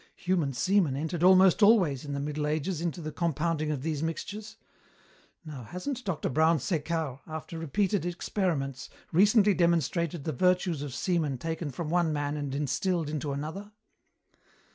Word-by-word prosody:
Human 180 -7 0
semen 170 +2 +2
entered 160 +4 -3
almost 185 +2 +6
always, 185 - +4
in 145 - -4
the 140 - -2
Middle 150 +1 -2
Ages, 155 +3 -1
into 170 0 -3
the 155 -1 -5
compounding 165 -1 -1
of 145 -4 -2
these 155 -2 -2
mixtures. 205 +7 -5 0.9
Now, 150 -5 -7
hasn't 235 - -5
Dr. 190 -8 -2
Brown 160 +4 +3
Sequard, 155 -2 -2
after 160 +1 -6
repeated 190 +6 0
experiments, 170 - -2 0.2
recently 205 +3 +5
demonstrated 170 -2 +1
the 155 - -2
virtues 180 +1 +1
of 140 -3 -5
semen 160 -5 0
taken 160 +3 -4
from 150 +4 -5
one 170 -2 +2
man 145 -1 -2
and 145 -2 -3
instilled 155 +3 -1
into 150 -1 -3
another? 160 +9 -5
160 Hz, 150 wpm, -29 LUFS, 145-180 Hz, 0.9 s, almost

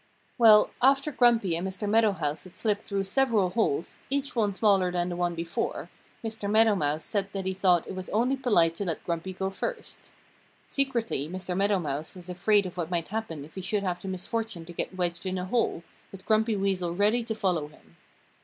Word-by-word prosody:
Well, 215 -2 +7
after 275 +3 +4
Grumpy 235 - +3
and 175 +3 -2
Mr. 195 +2 -3
Meadow 220 0 +4
Mouse 150 -4 -3
had 185 - -13
slipped 210 -2 -1
through 200 -1 -1
several 210 -3 +2
holes, 180 -7 -1
each 280 0 -2
one 215 -3 +2
smaller 195 -3 +3
than 175 0 -1
the 175 - -3
one 175 -1 -1
before, 165 0 -3 0.3
Mr. 220 -2 -4
Meadow 220 +1 +5
Mouse 150 -4 -1
said 200 -1 -2
that 195 -1 -3
he 190 - -1
thought 185 -3 +3
it - - -5
was 185 -1 -6
only 245 +5 +2
polite 205 -11 +3
to 200 - -2
let 165 -4 -3
Grumpy 170 +2 -3
go 190 +1 -3
first. 460 - -6 0.6
Secretly 235 - -1
Mr. 185 0 -4
Meadow 200 +1 +2
Mouse 150 -1 -4
was 180 0 -10
afraid 200 +3 +2
of 180 0 -7
what 170 -2 -2
might 170 -2 -2
happen 190 -9 -4
if 155 - -17
he 190 - -6
should 200 +2 -1
have 180 -2 -2
the - - -7
misfortune 190 -1 -4
to 175 - -10
get 185 - -4
wedged 175 0 -1
in 185 0 -2
a 180 - -3
hole, 190 -5 0 0.3
with 190 -1 -11
Grumpy 220 0 +2
Weasel 190 -3 -1
ready 210 +5 +2
to 225 -1 -4
follow 180 -8 0
him. 85 - -21
190 Hz, 210 wpm, -27 LUFS, 175-220 Hz, 0.6 s, Well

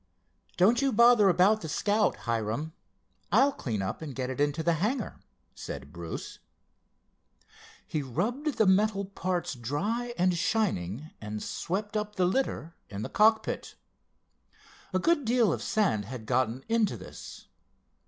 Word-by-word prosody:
"Don't 225 +8 +4
you 275 -1 +2
bother 235 -3 +6
about 195 +5 +4
the 160 - -5
Scout, 205 +5 +1
Hiram. 115 +7 -2 0.6
I'll 280 +1 +5
clean 110 - -3
up 95 - -4
and 145 -5 -6
get 130 -1 -2
it 130 - -3
into 145 +2 +1
the 170 +1 +3
hangar," 230 +3 -1 0.3
said 70 +3 -8
Bruce. 85 -1 -7 1.5
He 155 - -2
rubbed 240 - -2
the 220 - +4
metal 200 +1 +3
parts 185 -3 -2
dry 205 - -2
and 180 0 +2
shining 165 - -1
and 105 0 -5
swept 205 +4 -3
up 210 0 -2
the 185 - +2
litter 180 - -1 0.2
in 100 +1 -5
the - - -4
cockpit. 220 +1 +2 1.2
A 185 - +1
good 295 - +2
deal 235 -2 +3
of - - -4
sand 180 - +1
had 120 0 -7
gotten 130 +1 0
into 225 -2 +1
this. - - -11
185 Hz, 145 wpm, -29 LUFS, 130-220 Hz, 1.5 s, bother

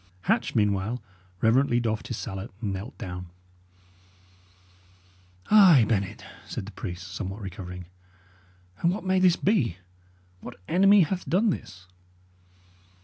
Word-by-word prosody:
Hatch - - 0
meanwhile 105 +3 +1 0.4
reverently 120 +2 +3
doffed 110 -2 -2
his 120 - -4
salet 95 +1 -6
and 105 -3 -3
knelt 100 +8 -7
down. 90 -5 -6 2.2
"Ay, 185 - +8
Bennet," 100 -4 -2 0.2
said - - -5
the 105 - -9
priest, 90 -1 -7
somewhat 95 +2 -5
recovering, 90 -2 -7 0.9
"and 170 - +2
what 200 - -4
may 185 0 +2
this 185 -2 +5
be? 155 - +1 0.6
What 120 - -10
enemy 195 +3 +5
hath 180 +3 -1
done 200 +5 +3
this?" 90 - -7
110 Hz, 120 wpm, -26 LUFS, -, 2.2 s, Ay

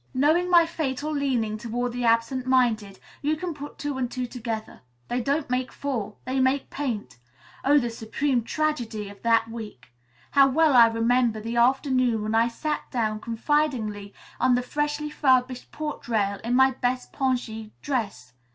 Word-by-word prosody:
"Knowing 315 +7 +3
my 345 -2 +6
fatal 305 -2 -3
leaning 250 -7 -1
toward 240 +2 -3
the 245 0 -3
absent 230 +3 +1
minded, 225 -6 +1 0.2
you 300 +2 +1
can 345 +2 -4
put 290 0 -9
two 290 -2 -3
and 250 -2 -1
two 250 0 -3
together. 230 -3 -6 0.3
They 245 +1 0
don't 280 +4 0
make 250 +1 -1
four. 230 -7 -4
They 260 +1 -1
make 260 +1 +1
'paint.' 235 - -4 0.4
Oh, 290 +2 +5
the 240 -4 +1
supreme 240 +4 -1
tragedy 235 -8 -2
of 200 - -14
that 230 -1 +3
week! 215 - -9 0.4
How 275 -1 +6
well 305 +2 +3
I 235 -1 +9
remember 230 0 +1
the 230 +2 -4
afternoon 255 -2 +2
when 215 +1 -2
I 225 +1 +4
sat 300 +6 -3
down 220 -4 -1
confidingly 230 -4 -1 0.3
on 255 -1 +4
the 250 - 0
freshly 295 +3 -2
furbished 255 -3 +1
porch 305 -4 -5
rail 200 -4 0
in 240 +2 0
my 265 +1 +5
best 250 0 -2
pongee 245 -5 -2
dress. 205 - -3
250 Hz, 165 wpm, -25 LUFS, 225-280 Hz, 0.4 s, I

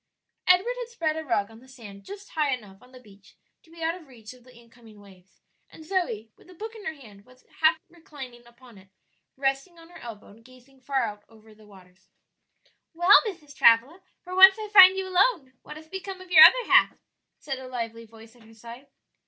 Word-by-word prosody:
Edward 365 +7 +3
had 480 -1 -7
spread 325 -10 -3
a 320 - -6
rug 225 -7 -2
on 225 - -16
the 260 - -20
sand 215 -7 -14
just 400 0 -12
high 295 -4 -1
enough 205 -4 -17
on 250 0 -21
the 255 - -15
beach 200 -4 -21 0.3
to - - -27
be 330 0 -11
out 325 +1 -1
of 345 -4 -14
reach 230 -3 -14
of 250 -1 -21
the 255 0 -20
incoming 230 -2 -19
waves, 195 -2 -21 0.3
and 315 - -15
Zoe, 235 - -4
with - - -23
a 365 - -16
book 440 +5 -9
in 440 -2 -13
her 315 - -5
hand, 210 -8 -17
was 255 +3 -24
half 320 +1 +3
reclining 275 -8 -13
upon 240 -3 -19
it, 190 0 -22 0.5
resting 275 +6 -3
on 330 0 -17
her 350 - -15
elbow 225 -3 -11
and 220 +3 -19
gazing 255 +2 -21
far 265 0 -2
out 210 -2 -7
over 220 -1 -20
the 215 0 -21
waters. 185 -2 -21 0.9
"Well, 350 +4 +5
Mrs. 305 -8 -9
Travilla, 250 +12 +3 0.2
for 365 - -10
once 380 +1 +7
I 430 -1 -8
find 380 -1 +8
you 380 0 -4
alone. 365 - 0
What 300 - -12
has 315 0 -15
become 380 +2 -8
of 370 -1 -15
your 315 -2 +10
other 485 +8 +4
half?" - - +3 0.4
said 270 -2 -7
a 260 - -11
lively 230 -2 -7
voice 225 +1 -18
at 240 - -22
her 225 0 -19
side. 235 +5 -13
260 Hz, 220 wpm, -25 LUFS, 225-345 Hz, 0.9 s, your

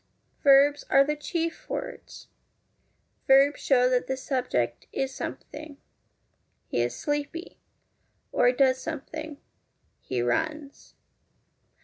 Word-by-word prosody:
Verbs 280 +1 +5
are 275 - +6
the 300 +2 -1
chief 330 +2 -4
words. - - -6 1.0
Verbs 275 +1 +5
show 250 -2 +4
that 250 -1 +1
the 265 - -2
subject 245 - -2
is 270 0 -2
something 300 -1 -7 0.9
He 120 - -1
is 120 0 -1
sleepy; 295 +4 -4 0.7
or 245 - +4
does 260 0 +2
something 310 0 -6 0.6
He 125 - -4
runs. 285 - -3
275 Hz, 100 wpm, -27 LUFS, 255-295 Hz, 1.0 s, are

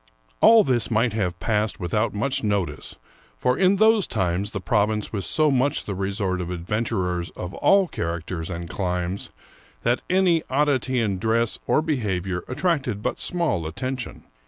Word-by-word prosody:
All 225 -1 +8
this 125 - +1
might 115 0 +2
have 95 -5 -2
passed 105 +5 0
without 105 +5 0
much 115 +6 -1
notice, 100 -4 -2 0.4
for 125 - +1
in 185 +3 +4
those 220 0 +4
times 95 -1 -1
the 100 - -4
province 105 +4 0
was 100 -3 -2
so 155 -2 +3
much 135 +1 +1
the 100 - -4
resort 95 -1 -2
of 90 - -4
adven 90 +6 -2
turers 90 -5 -2
of 90 +1 -5
all 195 -1 +4
characters 85 - -4
and 85 -1 -5
climes 90 +1 -3 0.5
that 120 +2 +1
any 180 -3 +3
oddity 130 -2 +1
in 100 -5 0
dress 115 +2 0
or 155 - +3
behavior 95 - -2
attracted 130 - -1
but - - -2
small 165 - 0
attention. 130 +9 -5
105 Hz, 160 wpm, -24 LUFS, 90-130 Hz, 0.5 s, All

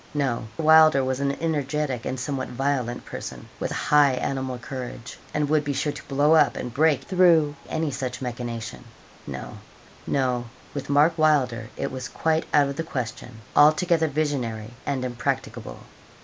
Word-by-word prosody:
No; 130 -6 -1
Wylder 155 -3 +6
was 130 0 -1
an 140 0 0
energetic 150 -5 -1
and 130 - -3
somewhat 130 0 -3
violent 125 -2 -2
person, - - -7
with - - -2
high 145 -2 +4
animal 130 0 -2
courage, 125 -1 -7
and 150 -1 0
would 150 0 +2
be 145 0 -2
sure 150 +2 -1
to - - -11
blow 145 +3 +3
up 160 - +5
and 125 - -5
break 145 -1 +3
through 165 -4 +4
any 160 -2 -1
such 130 -1 -4
machination. 115 - -5 0.4
No, - - -7 0.5
no; 125 -3 0 0.3
with 140 -1 -5
Mark 150 +4 +4
Wylder 125 -8 +2
it - - -2
was 130 0 -5
quite 160 0 0
out 145 -2 +4
of 140 0 -5
the 165 - -1
question 125 -5 -6
altogether 160 +2 +5
visionary 125 -7 -2
and 130 -2 -1
impracticable. 120 - -3
140 Hz, 155 wpm, -25 LUFS, 125-150 Hz, 0.5 s, Wylder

